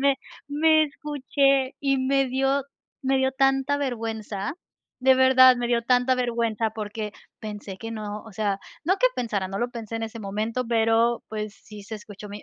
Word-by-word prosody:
me 275 0 +3 0.3
me 310 +1 +4
escuché, 275 -2 +1
y 275 -1 +2
me 270 +1 +2
dio 270 +2 +1 0.4
me 265 0 +2
dio 265 0 +1
tanta 270 +1 +2
vergüenza, 225 -4 -3 0.5
de 265 +1 +6
verdad, 260 -1 +7
me 240 0 -1
dio 235 -1 +2
tanta 250 +1 +3
vergüenza, 230 -3 0
porque, 210 -1 -5 0.3
pensé 210 -3 -7
que 225 0 -6
no, 210 -1 -5
o 220 - -12
sea, 200 -1 -1 0.3
no 375 +4 +3
que - - +5
pensara 205 -6 -1
no 195 - -4
lo 240 +2 -1
pensé 225 -2 -6
en 225 - -4
ese 225 +1 -7
momento, 215 +5 -2
pero 230 +1 +2
pues, 215 -1 -5
sí 210 -2 -12
se 220 +2 -7
escuchó 210 0 -11
mi. 205 +1 -8
235 Hz, 180 wpm, -25 LUFS, 215-265 Hz, 0.5 s, verdad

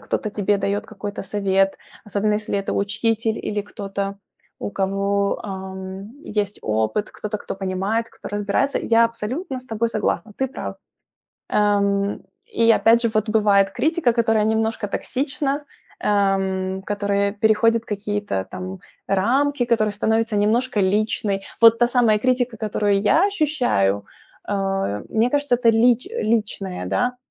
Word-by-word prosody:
кто-то 215 - -2
тебе 205 -1 +1
дает 200 +2 -1
какой-то 205 -1 -6
совет, 195 -1 +1 0.3
особенно 210 0 0
если 210 -1 -1
это 195 - -3
учитель 220 +2 0
или 205 -1 -2
кто-то, 200 -1 -5 0.4
у - - -4
кого, 200 +1 0
ам, 190 0 -7 0.3
есть 205 -1 -1
опыт, 110 - 0
кто-то, 210 0 -5
кто - - -6
понимает, 195 +4 -1
кто - - -10
разбирается. 205 +7 0
Я 230 0 +4
абсолютно 250 - -3
с - - -15
тобой 230 -1 -1
согласна, 215 0 -2
ты 265 - 0
прав. 265 - -6 0.7
Ам, 200 -1 +1 0.3
и 230 - +2
опять 230 +1 +5
же, 230 - +2
вот 215 0 0
бывает 205 -2 +3
критика, 310 - +1
которая 225 -2 +2
немножко 220 0 0
токсична, 275 +5 -2 0.3
ам, 190 -2 0
которая 200 0 0
переходит 220 +2 +3
какие-то 205 - -3
там 185 +1 -6 0.3
рамки, 255 +8 +2
которая 225 -3 +1
становится 220 +1 0
немножко 225 +3 +1
личной. 200 0 0 0.2
Вот 230 0 +7
та 240 0 +4
самая 235 -4 +3
критика, 250 -1 0
которую 205 -2 +1
я 315 - +4
ощущаю, 250 - +1 0.4
а, 195 - -1
мне 225 +2 +2
кажется, 285 -4 +2
это 240 -1 +4
лич 235 +2 +3
личная, 210 - -2
да, 175 - 0
210 Hz, 135 wpm, -22 LUFS, 200-230 Hz, 0.7 s, Вот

